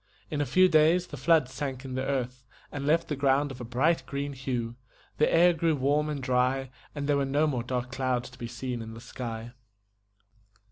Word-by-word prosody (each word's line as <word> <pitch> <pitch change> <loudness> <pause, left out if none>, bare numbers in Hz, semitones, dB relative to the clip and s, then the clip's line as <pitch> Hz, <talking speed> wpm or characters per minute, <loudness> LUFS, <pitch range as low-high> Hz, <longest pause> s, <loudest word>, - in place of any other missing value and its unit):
In 150 -1 -1
a 145 - -1
few 185 0 +5
days 165 +2 +4
the 155 - -9
floods 150 -1 +2
sank 135 -2 -4
in 130 - -6
the 130 - -1
earth, 130 -2 -2 0.3
and 140 -1 -4
left 165 +2 +3
the 150 - -2
ground 140 +1 +2
of 130 -1 -8
a - - -4
bright 130 +8 +1
green 140 0 -3
hue; 125 -3 -3 0.4
the 155 - +4
air 175 +1 +6
grew 165 -1 +1
warm 145 +3 +1
and 145 -3 -4
dry, 130 +1 +1 0.2
and 145 -1 -3
there 145 -1 +3
were 140 - +1
no 140 +3 +2
more 135 -6 0
dark 125 0 -3
clouds 130 -2 -1
to 125 - -16
be 120 - -4
seen 120 0 -4
in 110 0 -8
the - - -9
sky. 115 -1 -6
135 Hz, 215 wpm, -28 LUFS, 125-150 Hz, 0.4 s, air